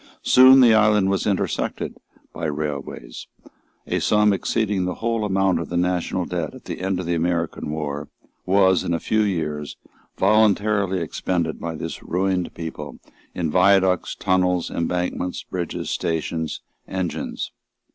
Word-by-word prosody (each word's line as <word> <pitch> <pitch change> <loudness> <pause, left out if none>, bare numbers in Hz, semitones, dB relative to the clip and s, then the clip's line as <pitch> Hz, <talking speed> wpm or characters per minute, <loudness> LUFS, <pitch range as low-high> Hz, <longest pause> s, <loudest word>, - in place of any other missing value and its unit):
Soon 130 +1 +8
the 120 -3 +7
island 105 -3 +4
was 100 - 0
intersected 100 -3 -1 0.4
by 85 - -5
railways. 70 -5 -5 0.6
A - - -1
sum 105 -1 +3
exceeding 100 -1 0
the 90 - -2
whole 115 -1 -1
amount 95 -2 +1
of - - -5
the 85 - -2
national 90 0 0
debt 85 -4 -4
at - - -14
the - - -6
end 95 -1 -1
of 90 - -4
the 85 - -1
American 85 -2 -1
war 75 -1 -4 0.3
was, 95 0 +3
in 85 - 0
a - - -2
few 110 +5 +1
years, 75 -8 -2 0.4
voluntarily 100 -1 +3
expended 85 0 -2
by 85 -1 -4
this - - -6
ruined 90 0 -1
people 80 -3 -7 0.4
in 85 -3 -1
viaducts, 95 0 +3
tunnels, 90 -2 +1
embankments, 90 +1 -2
bridges, 90 -2 -4
stations, 80 -1 -2 0.3
engines. 95 -3 -4
90 Hz, 140 wpm, -22 LUFS, 85-100 Hz, 0.6 s, Soon